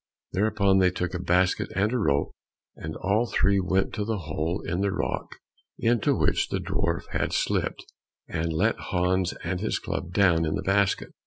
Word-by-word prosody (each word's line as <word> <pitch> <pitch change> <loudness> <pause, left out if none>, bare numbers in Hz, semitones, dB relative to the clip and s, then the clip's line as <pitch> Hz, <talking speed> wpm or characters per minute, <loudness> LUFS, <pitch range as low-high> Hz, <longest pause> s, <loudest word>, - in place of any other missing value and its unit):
Thereupon 100 -1 +2
they 95 -1 +5
took 90 0 -3
a 90 - -2
basket 90 +1 +2
and 105 +5 +1
a - - +2
rope, 70 -9 +1 0.4
and 80 0 -6
all 105 +5 +1
three 100 -3 +2
went 95 +1 0
to 105 - -2
the 110 +1 -1
hole 80 +1 -3
in 90 +2 -1
the 100 0 +1
rock - - -3 0.4
into 115 -1 +2
which - - +1
the - - -2
dwarf 85 0 -1
had - - -1
slipped, - - -1 0.4
and 80 +1 -2
let 95 +8 +1
Hans 90 0 0
and 90 +2 -2
his 110 - 0
club 85 - -4
down 90 -4 +4
in 80 -1 0
the - - -3
basket. 100 0 +1
95 Hz, 180 wpm, -26 LUFS, 85-100 Hz, 0.4 s, they